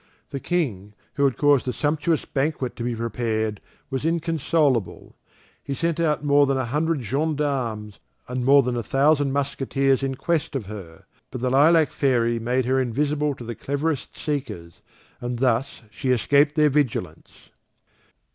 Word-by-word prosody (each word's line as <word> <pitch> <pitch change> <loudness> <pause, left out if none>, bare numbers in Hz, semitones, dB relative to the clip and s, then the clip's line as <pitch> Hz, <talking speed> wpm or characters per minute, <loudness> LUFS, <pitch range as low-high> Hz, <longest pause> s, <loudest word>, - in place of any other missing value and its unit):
The 140 - -3
King, 110 - -2 0.2
who 140 - +1
had 135 - +1
caused 145 -3 +3
a - - +1
sumptuous 155 +3 0
banquet 135 -2 -2
to 120 - -5
be 120 0 -2
prepared, 110 -2 -2 0.3
was 135 0 -2
inconsolable. 160 - 0 0.5
He 140 - -4
sent 165 +2 -1
out 155 -3 +1
more 145 0 +4
than 135 0 +1
a 130 - -1
hundred 150 +3 -1
gendarmes, 135 -5 -2 0.3
and 125 0 -3
more 140 +2 +6
than 125 0 -2
a 120 - -1
thousand 140 +3 +2
musketeers 135 -1 0
in 135 -1 -2
quest 160 +1 -1
of 125 -6 -2
her; 95 -5 -10 0.2
but 125 - -7
the 125 0 0
Lilac 155 +3 +5
fairy 120 -4 +1
made 125 +2 0
her 130 +1 +2
invisible 145 +4 0
to 120 - -10
the 120 0 -5
cleverest 140 +4 -3
seekers, 130 - -5 0.4
and 120 0 -4
thus 125 +1 0
she 130 +4 -4
escaped 140 +6 +3
their 150 -2 +4
vigilance. 110 - -3
135 Hz, 155 wpm, -24 LUFS, 120-150 Hz, 0.5 s, more